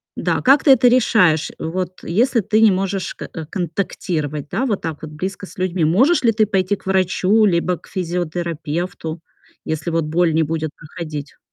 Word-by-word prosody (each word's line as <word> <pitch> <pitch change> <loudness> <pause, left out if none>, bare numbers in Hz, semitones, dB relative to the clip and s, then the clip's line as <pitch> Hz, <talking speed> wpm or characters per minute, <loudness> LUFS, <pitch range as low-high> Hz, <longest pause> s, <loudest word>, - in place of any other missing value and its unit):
да, - - -1
как 275 +2 +5
ты 285 - +6
это 250 -1 +6
решаешь? 220 -10 +3
Вот 180 +2 -4
если 230 +7 +1
ты 215 +2 +1
не 220 -2 +7
можешь 195 0 -2
к - - -9 0.2
контактировать, 160 -5 -3
да, 265 - -1
вот 210 -6 -1
так 160 -2 -5
вот 155 - -7
близко 190 +6 -5
с 185 - -14
людьми, 185 -3 0
можешь 255 - +3
ли 230 - +5
ты 215 0 +2
пойти 195 0 +1
к 190 - -17
врачу 190 +3 +3
либо 180 -1 +1
к - - -20
физиотерапевту, 170 -1 -3 0.4
если 160 +2 -3
вот 165 -1 0
боль 165 +1 +1
не 160 - +2
будет 160 0 -2
проходить? 150 -2 -8
180 Hz, 175 wpm, -20 LUFS, 160-200 Hz, 0.4 s, не